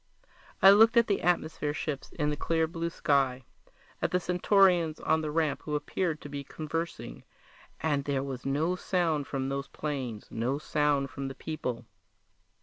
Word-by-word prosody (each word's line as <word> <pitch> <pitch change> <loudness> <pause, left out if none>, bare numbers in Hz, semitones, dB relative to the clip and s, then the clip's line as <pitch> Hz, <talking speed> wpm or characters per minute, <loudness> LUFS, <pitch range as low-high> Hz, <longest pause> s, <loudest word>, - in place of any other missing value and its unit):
I 195 - +11
looked 225 +3 +6
at 235 - +6
the 200 - 0
atmosphere 155 -3 0
ships 150 -4 -4
in 150 -1 0
the - - -1
clear 160 +2 +1
blue 165 +1 -3
sky, 135 -5 +1 0.6
at - - +1
the 180 - +1
Centaurians 180 -2 +3
on 160 0 +1
the 155 - -3
ramp 155 -1 0
who 150 - -2
appeared 160 +1 -2
to - - -8
be 140 -1 -5
conversing 155 - -5 0.6
and 145 -3 0
there 140 -2 0
was 130 -2 -6
no 155 +6 0
sound 165 -6 0
from 135 -1 -2
those 140 0 -3
planes, 130 -8 -4
no 125 +5 -1
sound 145 -2 0
from 135 -1 -5
the 135 - -6
people! 130 -6 -4
150 Hz, 165 wpm, -29 LUFS, 140-165 Hz, 0.6 s, I